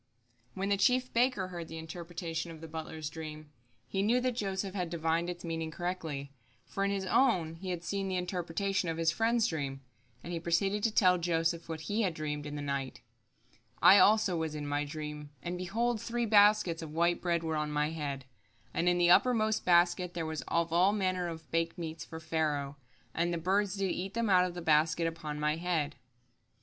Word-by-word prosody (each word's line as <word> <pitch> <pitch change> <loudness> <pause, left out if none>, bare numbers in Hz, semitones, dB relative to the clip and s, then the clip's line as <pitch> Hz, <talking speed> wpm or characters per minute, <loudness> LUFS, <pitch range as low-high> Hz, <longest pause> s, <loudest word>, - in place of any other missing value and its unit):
When 195 +1 -2
the 200 - +3
chief 255 +5 +2
baker 235 -6 +2
heard 170 -2 -6
the 160 - -8
interpretation 165 0 -5
of 165 -1 -9
the 165 - -8
butler's 160 -1 -6
dream, 155 -1 -8 0.4
he 195 - -1
knew 230 +5 +3
that 255 0 +1
Joseph 195 -4 -3
had 180 -4 -2
divined 165 +1 0
its 175 0 -6
meaning 165 -1 -3
correctly, 160 -5 -4 0.3
for 195 - -3
in 200 - +2
his 195 -1 -2
own 185 -8 +2
he 185 +2 -6
had 175 -2 -3
seen 195 +1 -2
the 190 - -2
interpretation 180 +1 -1
of 165 - -2
his 165 0 +2
friend's 230 +3 +2
dream, 140 -8 -3 0.4
and 175 - -6
he 170 - -2
proceeded 195 +5 +1
to 225 - +2
tell 180 -4 +4
Joseph 165 0 0
what 160 -1 -4
he 205 +7 -1
had 185 -6 0
dreamed 150 -1 -4
in 145 - -6
the 145 - -4
night: 140 -2 -3 0.8
"I 195 - +8
also 210 -3 +5
was 160 -2 -2
in 150 -1 -4
my 145 0 -1
dream, 150 0 -6
and, 175 +1 -3
behold, 220 +6 -1
three 240 0 -1
baskets 205 -5 +4
of 160 - -6
white 170 +2 +1
bread 170 -2 0
were 160 -1 -1
on 150 0 -1
my 150 +1 0
head; 140 -4 -4 0.5
and 175 - +2
in 175 - +2
the 175 0 +4
uppermost 220 -1 +3
basket 175 0 +3
there 165 -2 -2
was 160 -1 -3
of 170 -1 0
all 185 +4 +4
manner 185 -3 0
of 160 -2 -8
bake 165 0 0
meats 160 -1 -5
for 160 -1 -8
Pharaoh; 155 -3 -1 0.4
and 170 +1 0
the 170 - -1
birds 195 +4 +1
did 195 -2 0
eat 190 +3 -4
them 230 -3 +1
out 180 -1 +6
of 180 -1 -5
the 175 - -6
basket 160 +1 +3
upon 160 -2 -4
my 150 +1 +1
head." 165 -4 -1
170 Hz, 205 wpm, -31 LUFS, 160-195 Hz, 0.8 s, I